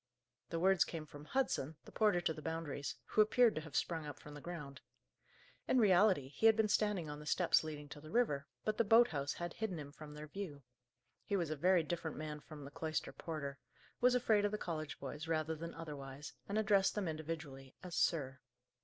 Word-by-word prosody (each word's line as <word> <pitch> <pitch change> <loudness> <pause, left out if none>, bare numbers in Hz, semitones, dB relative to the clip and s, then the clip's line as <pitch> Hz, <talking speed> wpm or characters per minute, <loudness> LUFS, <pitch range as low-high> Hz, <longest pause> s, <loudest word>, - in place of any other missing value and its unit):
The 165 - -2
words 190 +1 +5
came 160 -2 -6
from 145 0 -11
Hudson, 160 - 0
the - - -12
porter 210 -5 +3
to 165 - 0
the 155 - -9
Boundaries, 160 -3 -3
who 215 - +3
appeared 225 +2 +5
to 155 - -3
have 155 -2 -10
sprung 160 -3 0
up 145 - -6
from 150 - -11
the 145 - -9
ground. 150 -5 -7 0.9
In - - +3
reality, 190 - +5
he 220 +10 +3
had 220 - +7
been 220 -1 +2
standing 205 -6 +1
on 150 0 -6
the 150 - -10
steps 175 -1 +4
leading 150 -2 -6
to 145 - -9
the 155 - -11
river, 150 -10 +1 0.2
but 215 0 0
the - - +6
boat 225 +3 +6
house 145 -2 -2
had 175 -1 -4
hidden 215 -6 -3
him 145 -2 -7
from 150 0 -10
their 150 0 -7
view. 155 -4 -6 0.6
He 200 - -1
was 170 -5 0
a - - 0
very 180 +3 +4
different 160 0 -3
man 150 0 -4
from 150 -1 -10
the 140 - -9
cloister 155 +1 -3
porter; 145 -4 -5 0.4
was 250 +1 +5
afraid 220 -4 +3
of 205 - +2
the 210 - -1
college 155 -6 -4
boys, 145 +4 -6
rather 160 -1 0
than 165 +2 -6
otherwise, 145 -3 -7 0.2
and 205 - 0
addressed 200 -2 +3
them 205 -4 -1
individually 155 -4 -5
as 180 -2 -7
"sir." 135 -7 +1
160 Hz, 215 wpm, -37 LUFS, 150-195 Hz, 0.9 s, had